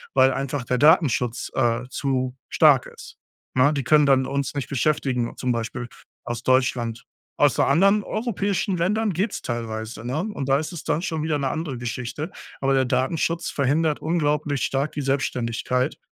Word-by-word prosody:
weil 130 0 +5
einfach 135 0 -3
der 125 - 0
Datenschutz, 140 -6 +3
äh, 120 -1 +1
zu 130 -2 -1
stark - - +5
ist, - - -13 0.4
ne? 130 +3 +4
Die 140 -3 -2
können 150 +1 +4
dann 130 -1 +4
uns 140 +1 -2
nicht 140 - -3
beschäftigen, 130 -3 0
zum 125 - -1
Beispiel 120 +1 -3 0.4
aus 120 -1 -4
Deutschland 125 -3 +1 0.3
aus, 145 -5 +3
äh, - - +6
anderen 195 +8 +4
europäischen 200 -3 -1
Ländern 205 +4 0
geht's 190 +7 -2
teilweise, 110 -1 -4
ne? 130 +5 -3 0.2
Und 135 -1 -4
da 135 - +5
ist 155 +3 -4
es 165 - -7
dann 160 +2 -1
schon 160 -6 -2
wieder 155 -1 0
‘ne 140 - -1
andere 155 -6 -3
Geschichte. 125 - -5 0.3
Aber 135 0 +1
der 135 -1 +3
Datenschutz 145 +6 0
verhindert 150 +3 +1
unglaublich 150 -5 0
stark 140 +3 0
die 145 - -3
Selbständigkeit 125 -1 -1
135 Hz, 170 wpm, -23 LUFS, 125-155 Hz, 0.4 s, äh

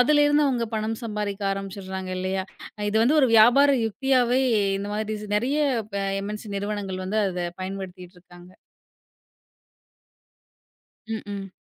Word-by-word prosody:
அதுல 295 +3 +5
இருந்து 290 0 +3
அவங்க 240 -3 0
பணம் 220 +1 -2
சம்பாதிக்க 210 -2 -3
ஆரம்பிச்சிருறாங்க 190 -1 -5
இல்லையா? 190 0 -2 0.5
இது 215 - 0
வந்து 295 +7 +4
ஒரு 265 - +4
வியாபார 245 +6 +7 0.2
யுக்தியாவே. 255 +2 +2 0.4
இந்த 200 - -4
மாரி 215 0 -2 0.2
நிறைய 260 +7 0 0.6
எம். 200 +1 -5
என். 210 - -7
சி 215 - -9
நிறுவனங்கள் 200 -2 -4
வந்து 215 +3 -1
அத 180 -2 -3 0.2
பயன்படுத்திட்டு 185 -1 -7
இருக்காங்க. 175 0 -16 2.5
ம், 220 -1 -4
ம். 195 -1 -6
210 Hz, 130 wpm, -25 LUFS, 190-240 Hz, 2.5 s, வியாபார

